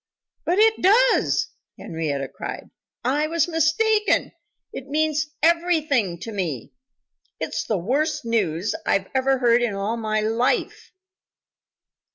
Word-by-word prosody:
"But 355 - +1
it 440 +1 +4
does!" 465 +7 +3 0.3
Henrietta 150 -4 -3
cried. - - -8 0.3
"I 290 +4 +1
was 330 0 +1
mistaken. 395 +6 +2 0.4
It 270 - -7
means 305 +1 0 0.2
everything 315 - +2
to 225 - -6
me. 170 - -4 0.7
It's - - -3
the 215 - 0
worst 290 - -1
news 200 -5 0
I 195 -1 +1
ever 265 0 +2
heard 240 -1 +3
in 230 -4 -1
all 205 +4 -2
my 215 -1 -1
life." 225 +3 -1
260 Hz, 120 wpm, -23 LUFS, 210-320 Hz, 0.7 s, it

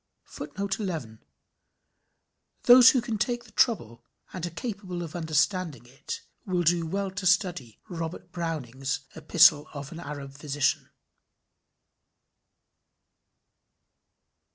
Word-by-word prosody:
[Footnote:11 185 - -4 1.4
Those 245 0 +9
who 255 - +3
can 225 -3 -3
take 240 +2 -1
the 230 - -18
trouble, 120 - +1 0.3
and 180 - -6
are 175 - -1
capable 185 -2 -5
of 165 -1 -8
understanding 160 - 0
it, 125 +2 -7 0.2
will 180 -2 0
do 170 0 +2
well 195 +3 -2
to 190 0 -2
study 175 - +1
Robert 175 -1 -6
Browning's 145 -5 -3
"Epistle 160 -1 +5
of 140 0 -7
an 170 - -8
Arab 145 -4 -7
Physician." 145 -1 -1
170 Hz, 105 wpm, -27 LUFS, 145-190 Hz, 1.4 s, Those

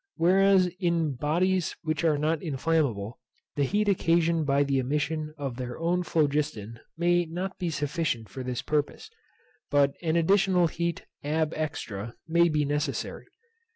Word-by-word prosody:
Whereas 190 +2 +4
in 170 -5 +1
bodies 170 +7 0
which 155 0 -1
are 155 -3 +3
not 155 +2 0
inflammable, 135 - -1 0.4
the 145 - +1
heat 210 +8 0
occasioned 170 -4 +2
by 140 +1 +3
the 140 -1 +1
emission 150 +3 -2
of 135 -4 -4
their 125 -1 -5
own 175 +2 0
phlogiston 145 - -1 0.2
may 175 +1 +2
not 180 +4 -5
be 175 - -1
sufficient 150 -6 -2
for 130 - -8
this 125 -2 -4
purpose, 150 - -2 0.6
but 140 -1 +3
an 165 -2 0
additional 185 +1 +3
heat 170 +1 -2 0.2
ab 155 +2 0
extra 115 -8 -4
may 170 +1 +4
be 150 -2 +1
necessary. 145 +1 -3
155 Hz, 145 wpm, -27 LUFS, 140-170 Hz, 0.6 s, Whereas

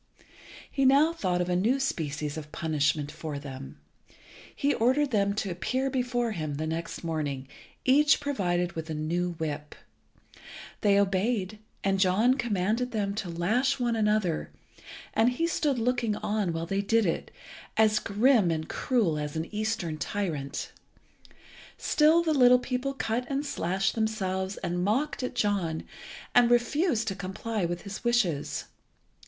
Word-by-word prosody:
He 275 - 0
now 280 +5 +5
thought 180 - 0
of 175 - -1
a 180 - +1
new 230 +9 +2
species 150 - -2
of 150 -1 -7
punishment 150 -2 0
for 155 -3 -5
them. 135 -1 -8 0.8
He 285 +1 +1
ordered 260 +5 +2
them 200 -2 +2
to 200 -3 -2
appear 260 +10 -1
before 245 -2 0
him 155 -7 -3
next 160 +4 -4
morning, 145 -5 -3 0.4
each 285 +3 +5
provided 180 - 0
with 160 -1 -6
a 155 - -3
new 175 +3 -1
whip. 150 -2 -5 1.1
They 200 -1 +4
obeyed, 200 +1 0 0.2
and 195 0 +1
John 200 +7 +4
commanded 235 -1 0
them 205 -4 -1
to 200 -3 -4
lash 205 +11 +1
one 240 -2 +1
another, 210 -6 +1 0.6
and 230 +3 +3
he 330 +7 0
stood 295 -5 0
looking 235 -2 0
on 210 -3 -1
while 165 0 -3
they 195 +3 -1
did 225 +2 +2
it, 165 - -1 0.5
as 215 -1 +4
grim 215 -1 +3
and 160 -1 -2
cruel 205 -12 0
as 150 0 -4
an 160 +5 -4
Eastern 210 -7 -2
tyrant. 160 -10 -3 1.1
Still 320 +3 +4
the 320 -2 +1
little 250 -3 +7
people 255 +2 -3
cut 245 -1 -2
and 280 +1 -1
slashed 195 -6 0
themselves 195 -4 -1
and 175 +1 -1
mocked 265 +10 0
at 250 0 -4
John, 195 -8 0 0.5
and 245 -1 +6
refused 240 - +2
to 195 - -4
comply 195 +2 -3
with 175 0 -3
his 200 -1 -7
wishes. 200 -12 +1
205 Hz, 150 wpm, -28 LUFS, 170-245 Hz, 1.1 s, little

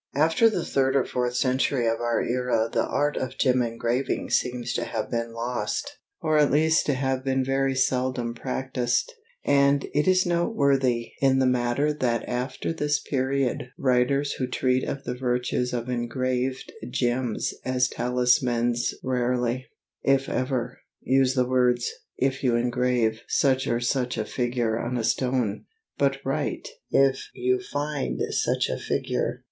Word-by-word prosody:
After 165 +10 +4
the 180 -6 -2
third 135 0 +1
or 135 - +3
fourth 125 -1 -2
century 130 0 +1
of 115 0 +1
our 120 -1 +1
era 120 -2 0
the - - +2
art 145 0 0
of 130 0 -4
gem 130 -1 +3
engraving 120 +2 -1
seems 125 -1 0
to - - -1
have 110 - -4
been 115 -1 -2
lost, 120 - -3 0.2
or 155 -1 +3
at 150 - +4
least 160 +2 +3
to 145 - +2
have 130 0 -1
been 130 -1 0
very 135 0 +1
seldom 130 -2 0
practised, 130 - -1 0.3
and 140 0 +3
it 150 +3 +1
is 185 0 +4
noteworthy 140 - +1
in 135 -1 +4
the 135 - +3
matter 125 +4 +1
that 120 -5 -1
after 130 +5 -3
this 150 -2 0
period 130 -2 -1
writers 140 +2 +2
who 130 - -2
treat 130 0 +1
of 140 - -4
the 125 - -3
virtues 125 0 -1
of 120 -1 -3
engraved 125 +1 -2 0.2
gems 125 -2 -1
as 125 -1 +1
talismans 125 -1 +1
rarely, 125 -1 0 0.3
if 135 0 +2
ever, 130 -2 -2 0.2
use 135 0 +3
the 125 -1 +2
words 125 -1 +2 0.3
"if 135 0 0
you 125 -3 +3
engrave" 120 -2 +1
such 130 -1 +2
or 120 0 +1
such 125 0 -1
a 110 - -1
figure 120 -2 -1
on 120 +1 -2
a 115 - -1
stone, 125 -3 0 0.3
but 140 -1 +2
write 140 +2 -2 0.2
"if 135 -1 +2
you 125 +1 +1
find" 145 -1 -3
such - - +1
a - - -3
figure. - - -2
130 Hz, 150 wpm, -25 LUFS, 120-135 Hz, 0.3 s, After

